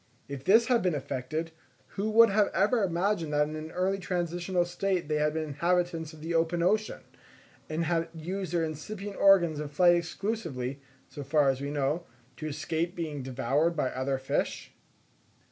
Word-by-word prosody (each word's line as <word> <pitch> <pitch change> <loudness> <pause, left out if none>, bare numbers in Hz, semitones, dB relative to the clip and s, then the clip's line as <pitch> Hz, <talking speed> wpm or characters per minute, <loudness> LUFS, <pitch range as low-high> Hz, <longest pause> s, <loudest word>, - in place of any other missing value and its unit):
If 140 -1 -7
this 220 +8 +5
had 240 -1 +3
been 180 -3 +1
effected, 145 +4 -3 0.4
who 205 +3 -2
would 225 0 +6
have 205 0 +3
ever 210 +6 +3
imagined 175 -2 0
that 150 0 +3
in 155 - -6
an 155 0 -6
early 190 +3 -1
transitional 175 0 -1
state 180 -1 -1
they 150 0 0
had 150 0 +2
been 160 - -1
inhabitants 170 +1 -1
of 155 -2 -14
the 165 +2 -3
open 165 +1 +1
ocean, 215 +4 +1 0.7
and 155 +2 -1
had 165 0 0
used 185 +4 -4
their 170 -2 +1
incipient 195 +6 -5
organs 175 -6 +5
of 150 -1 -5
flight 175 +3 +5
exclusively, 165 - -3 0.3
so 145 - -8
far 145 0 +3
as 135 0 -6
we 140 - -3
know, 145 +4 -1 0.3
to 155 - -5
escape 160 +4 -2
being 155 -4 -4
devoured 135 +6 0
by 135 -4 0
other 130 +1 -1
fish? 130 0 -2
165 Hz, 175 wpm, -29 LUFS, 150-185 Hz, 0.7 s, would